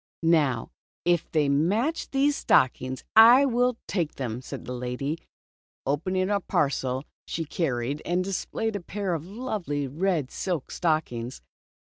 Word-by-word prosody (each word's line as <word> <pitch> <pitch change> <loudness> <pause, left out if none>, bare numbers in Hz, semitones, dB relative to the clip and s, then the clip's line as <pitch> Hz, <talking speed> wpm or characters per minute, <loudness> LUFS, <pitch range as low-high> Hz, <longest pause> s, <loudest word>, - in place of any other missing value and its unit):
Now 150 -8 +2 0.3
if 175 -1 +2
they 150 -3 +2
match 200 - +1
these 280 +1 +2
stockings, 130 - +2
I 235 +5 +9
will 245 -1 +2
take 170 -6 -1
them," 125 -2 -4
said - - -8
the 125 - -5
lady, 125 +5 -3 0.7
opening 185 +7 0
a 200 - +2
parcel 135 -6 0 0.2
she 165 - -3
carried 140 -3 -2
and 180 +1 0
displaying 205 +3 -2
a - - -1
pair 195 +1 -3
of 165 0 -4
lovely 195 - -3
red 155 -1 -1
silk 175 -8 -3
stockings. 130 -8 -1
165 Hz, 135 wpm, -26 LUFS, 135-200 Hz, 0.7 s, I